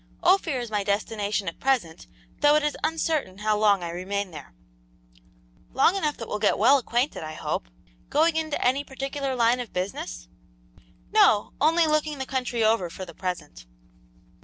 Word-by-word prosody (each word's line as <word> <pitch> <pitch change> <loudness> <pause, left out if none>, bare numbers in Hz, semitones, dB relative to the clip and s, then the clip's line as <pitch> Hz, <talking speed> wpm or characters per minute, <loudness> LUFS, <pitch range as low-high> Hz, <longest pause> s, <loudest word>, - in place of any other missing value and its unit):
"Ophir 345 -7 +3
is 240 -2 -6
my 205 -1 0
destination 205 0 -1
at 165 - -5
present, 240 -12 -1 0.3
though 295 0 +5
it 305 - +2
is 300 - 0
uncertain 310 - -1
how 215 +1 +1
long 205 -3 +3
I 170 - -4
remain 190 +2 -3
there." 145 - -11 1.2
"Long 275 +8 +4
enough, 305 -7 -1
that 230 - -7
we'll 210 - -3
get 210 - +2
well 280 +1 +5
acquainted, 245 +3 -1
I 155 0 -6
hope. - - -3 0.4
Going 320 +2 +3
into 315 -2 -1
any 265 +3 +2
particular 275 0 -4
line 240 +1 +3
of 245 -3 -6
business?" - - -4 0.8
"No, 205 - +4
only 325 +3 +4
looking 305 -1 0
the 265 - -4
country 250 -3 -1
over, 215 -5 +2
for 185 +3 -7
the 170 - -11
present." 160 - -6
235 Hz, 165 wpm, -25 LUFS, 195-290 Hz, 1.2 s, though